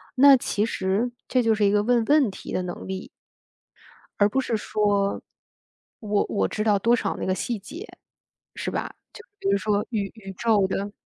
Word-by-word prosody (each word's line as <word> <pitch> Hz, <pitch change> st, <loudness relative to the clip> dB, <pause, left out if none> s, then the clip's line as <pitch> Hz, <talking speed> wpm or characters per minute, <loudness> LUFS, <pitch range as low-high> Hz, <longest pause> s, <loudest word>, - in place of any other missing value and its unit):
那 275 Hz, +1 st, +8 dB
其 210 Hz, -3 st, -1 dB
实 210 Hz, +3 st, -1 dB, 0.2 s
这 250 Hz, -1 st, +2 dB
就 225 Hz, -, +3 dB
是 210 Hz, -1 st, +2 dB
一 200 Hz, -, +4 dB
个 205 Hz, 0 st, +2 dB
问 240 Hz, 0 st, +2 dB
问 285 Hz, -7 st, +4 dB
题 -, -, -9 dB
的 185 Hz, -, 0 dB
能 180 Hz, 0 st, -6 dB
力。 190 Hz, 0 st, -5 dB, 1.1 s
而 205 Hz, -, +6 dB
不 265 Hz, +5 st, +1 dB
是 235 Hz, -4 st, -1 dB
说 205 Hz, -2 st, 0 dB, 0.8 s
我 210 Hz, -2 st, 0 dB
我 200 Hz, -, 0 dB
知 215 Hz, -, -3 dB
道 210 Hz, -2 st, +3 dB
多 235 Hz, +4 st, +3 dB
少 200 Hz, -4 st, -2 dB
那 -, -, -4 dB
个 185 Hz, -, +1 dB
细 235 Hz, +2 st, -2 dB
节 330 Hz, -, -9 dB, 0.7 s
是 -, -, -4 dB
吧？ -, -, -3 dB, 0.2 s
就 430 Hz, -, -11 dB, 0.2 s
比 -, -, -3 dB
如 200 Hz, -, +3 dB
说 205 Hz, +1 st, 0 dB
宇 205 Hz, -4 st, -2 dB
宇 195 Hz, -3 st, -9 dB
宙 215 Hz, -1 st, +2 dB
的 200 Hz, +2 st, -3 dB
210 Hz, 205 characters per minute, -24 LUFS, 200-235 Hz, 1.1 s, 那